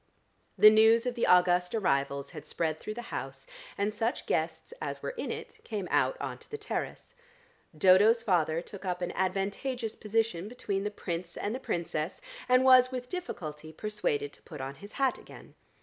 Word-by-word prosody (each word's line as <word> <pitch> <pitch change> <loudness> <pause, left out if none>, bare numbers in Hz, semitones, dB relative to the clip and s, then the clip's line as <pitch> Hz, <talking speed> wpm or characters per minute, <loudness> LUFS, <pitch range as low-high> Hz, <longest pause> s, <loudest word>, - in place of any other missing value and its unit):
The 215 - +9
news 220 +2 +5
of 250 - 0
the 235 - 0
august 180 +1 +4
arrivals 140 -7 0
had 150 -4 -8
spread 160 -2 -2
through 215 - -6
the 240 - -6
house, - - -5 0.3
and 205 +1 0
such 225 +3 -1
guests - - -2
as - - -4
were - - -2
in - - -5
it - - -7
came 205 -5 -4
out - - +2
on - - -4
to - - -16
the 440 - -5
terrace. 430 +3 -5 0.6
Dodo's 205 +7 +6
father 170 -5 +1
took 200 +2 -10
up 180 -1 -2
an 175 - -2
advantageous 200 +6 -2
position 215 -4 -1
between 205 -4 -3
the - - 0
Prince 170 -4 -5
and 205 - -2
the 255 - -3
Princess, 170 -7 -3 0.3
and 255 +1 +5
was 255 -1 +7
with 250 -1 -5
difficulty 155 - -6
persuaded 160 -7 -2
to - - -17
put 150 - -10
on 135 +1 -4
his 205 +6 -13
hat 270 -1 +1
again. - - -14
205 Hz, 180 wpm, -30 LUFS, 170-230 Hz, 0.6 s, The